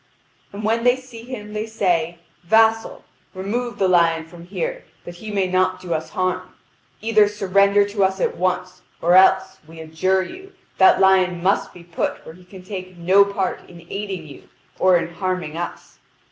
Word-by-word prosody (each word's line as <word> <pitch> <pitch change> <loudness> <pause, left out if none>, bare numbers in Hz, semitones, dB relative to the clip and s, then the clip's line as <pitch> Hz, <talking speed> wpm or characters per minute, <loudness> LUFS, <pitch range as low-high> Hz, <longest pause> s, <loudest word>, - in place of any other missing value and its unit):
And 205 +2 -8
when 225 +2 0
they 245 0 +4
see 255 -3 -12
him 225 -4 -8
they 215 +1 -3
say: 175 -6 0 0.3
"Vassal, 225 +3 +2 0.3
remove 235 +6 -3
the 190 - +2
lion 165 -3 +3
from 170 +1 -14
here - - -4 0.2
that 175 0 -9
he 215 +4 -9
may 200 -2 0
not 185 0 +1
do 175 -2 -4
us 160 0 -3
harm. 185 0 -3 0.5
Either 215 -2 +4
surrender 200 0 +3
to 205 0 -1
us 190 0 0
at - - 0
once, 185 +1 -2 0.2
or 170 +1 +2
else, 190 0 +4
we 165 0 -13
adjure 160 +4 0
you, 380 - -11 0.3
that 190 - +6
lion 185 -2 +3
must 195 +2 +1
be 175 - -14
put 170 -1 -4
where 160 - -10
he 180 +1 -18
can 185 0 -13
take 185 -2 -8
no 185 +4 +5
part 200 -2 -2
in 170 -1 -13
aiding 195 -4 -5
you 145 - -14 0.3
or 185 -1 +5
in 170 0 -4
harming 185 -4 -3
us. 175 +1 -7
190 Hz, 180 wpm, -21 LUFS, 175-210 Hz, 0.5 s, that